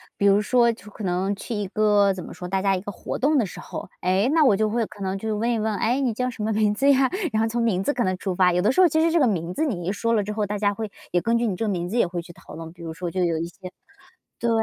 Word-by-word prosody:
比 200 - +2
如 200 +1 +5
说 235 +2 +3
去 210 -2 -12
可 215 - -9
能 190 +2 0
去 225 +3 -6
一 205 -1 -2
个 205 -1 +3
怎 185 - -7
么 - - -9
说， 180 - -7
大 190 +1 -1
家 195 -1 +2
一 185 - -3
个 205 - -6
活 - - -5
动 290 +1 +2
的 225 - +2
时 - - -10
候。 - - -7
诶， 185 +5 +2
那 315 -2 +4
我 210 - +5
就 215 +1 +1
会 230 +1 0
可 205 - -13
能 190 +1 -2
去 220 +2 -3
问 225 +3 0
一 230 - +1
问： 215 0 -1
“诶， 245 +4 +1
你 250 -5 0
叫 250 +3 -1
什 225 -3 -6
么 220 0 0
名 210 -1 +2
字 275 +5 +4
呀？ 265 -1 +3 0.2
“然 220 - +2
后 225 - +1
从 235 +1 -1
名 195 -4 +1
字 290 - +1
可 240 - 0
能 185 0 0
出 185 -2 -3
发。 180 -1 +4
有 180 - +2
的 215 +6 +3
时 315 - 0
候 360 - +7
其 315 +1 +1
实 330 0 +3
这 340 - +3
个 275 - +4
名 175 -4 -1
字 315 - +1
你 185 - -2
一 - - +1
说 230 +3 -1
了 210 -2 +2
之 210 - -4
后， 210 -1 -1
大 205 0 -3
家 205 -1 +1
会 220 -2 -5 0.2
也 175 - +3
根 235 0 +1
据 235 - +1
你 195 - -1
这 225 - -2
个 - - 0
名 175 -2 -2
字 230 - -2
也 235 - +4
会 175 0 -4
去 170 - -13
讨 - - -14
论。 165 0 -8
比 170 -1 -13
如 160 -1 -5
说 175 +1 -4
就 185 +1 -1
有 165 -2 0
一 165 - -2
些 185 +1 -11 0.7
对 235 - 0
210 Hz, 365 characters per minute, -24 LUFS, 185-230 Hz, 0.7 s, 候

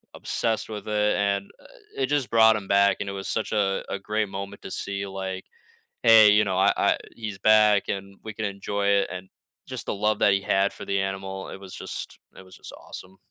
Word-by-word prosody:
obsessed 115 -1 -2
with 105 -1 -7
it, 105 0 +1
and 100 -1 -1 0.4
it 135 -1 0
just 145 -5 -1
brought 110 -1 +6
him 100 -2 -5
back, 100 -1 +4
and 100 -1 -4
it - - -3
was 95 0 -5
such 110 - -2
a 100 -3 0
a 100 - -3
great 105 0 -2
moment 100 +1 -7
to - - -8
see, 100 0 -3
like, 95 -1 -5 0.6
"Hey, 110 -2 +8
you 105 +1 +4
know, 95 -2 -2
I 95 - +4
I - - +2 0.2
he's 110 -4 -6
back, 105 0 +4
and 100 0 -5
we 110 -2 -7
can 110 - -4
enjoy 100 0 -3
it," 100 -1 +3
and 95 0 -7 0.4
just - - -6
the - - -2
love 105 +1 0
that 100 - +5
he 100 0 +1
had 100 0 +1
for - - -9
the 100 0 -1
animal, 95 0 -4
it - - -7
was 95 -2 -10
just - - -7 0.2
it 95 - -12
was 95 -1 -15
just - - -11
awesome. 95 +1 -11
100 Hz, 220 wpm, -25 LUFS, 95-105 Hz, 0.6 s, Hey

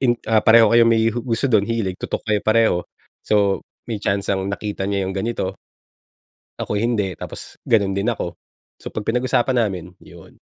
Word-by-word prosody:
in 120 -3 +2
ah, 110 -1 +3
pareho 115 -1 +6
kayong 115 0 +6
may 115 -1 +3
hu 120 - -3
gusto 115 +1 -2
dun, 110 -6 +4
hilig, 110 -5 -1
tutok - - -4
kayo 105 -2 +1
pareho. 110 -3 +3 0.4
So 100 -2 +1 0.2
may 110 -3 -4
tiyansang 100 -1 -1
nakita 100 -1 -3
niya 100 -1 0
yung 95 - -3
ganito, 100 -1 -3 1.0
ako 105 - -2
hindi 110 -5 0
tapos - - -9
ganun 100 -4 +3
din 100 +4 -1
ako. 90 -7 -2 0.5
So - - -6
pag 105 - -5
pinag-usapan 125 +2 +1
namin 90 -4 -3
yun. - - -16
110 Hz, 170 wpm, -21 LUFS, 100-115 Hz, 1.0 s, pareho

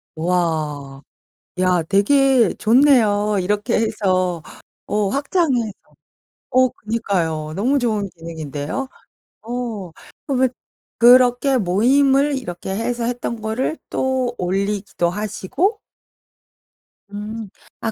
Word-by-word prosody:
와. 155 -5 -2 0.6
야 180 -2 +2
되게 235 - +3
좋네요. 215 -4 +3
이렇게 205 +3 0
해서 185 -6 0 0.5
어 210 -1 0
확장해서 275 - 0 0.7
어 255 0 +4
그니까요. 175 -10 -2
너무 255 +9 +1
좋은 215 -5 -1
기능인데요? 160 - -5 0.6
어 230 -5 -5 0.4
그러면 260 -2 +2 0.5
그렇게 250 +2 +5
모임을 270 +8 +3
이렇게 185 -7 -7
해서 235 +2 -2
했던 235 -1 -3
거를 220 +8 -2
또 260 -2 -1
올리기도 195 -1 -1
하시고? 215 - -2 1.3
음. 210 +1 -6 0.3
아 225 - -2
215 Hz, 200 characters per minute, -20 LUFS, 185-250 Hz, 1.3 s, 그렇게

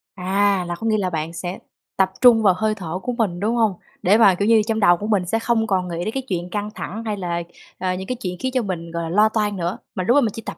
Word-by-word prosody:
À, 195 0 +1
là 175 - -3
có 225 +6 -4
nghĩa 215 -1 +2
là 185 -3 0
bạn 160 0 -3
sẽ 175 +2 -5 0.4
tập 190 -1 +3
trung 235 -3 +7
vào 190 -3 +5
hơi 215 0 0
thở 180 -2 -5
của 250 - -2
mình, 185 -6 0
đúng 220 +4 0
hông? 220 -4 +2 0.3
Để 200 +4 +4
mà, 195 -5 +6
kiểu 205 +3 -1
như, 225 -1 +5
trong 220 -1 0
đầu 175 -4 +5
của 210 - -5
mình 200 -5 +1
sẽ 225 +5 0
không 225 -1 +1
còn 185 -2 0
nghĩ 170 0 -4
đến 220 - -3
cái 265 -1 -3
chuyện 180 -1 -3
căng 210 +1 -3
thẳng 220 +3 -6
hay 210 -2 -2
là, 170 -2 -3 0.3
à, 185 0 -1
những 190 +1 -6
cái 250 - -2
chuyện 180 -1 -3
khiến 260 - -2
cho 255 -1 +1
mình 170 -5 -5
gọi 170 0 -3
là 165 - -4
lo 210 +4 +4
toan 210 -3 -1
nữa 175 +1 -2 0.2
mà 185 - -1
lúc 240 +8 +3
đó 290 - +6
mình 220 -4 +1
chỉ 225 - -7
tập - - -6
200 Hz, 300 wpm, -21 LUFS, 180-220 Hz, 0.4 s, trung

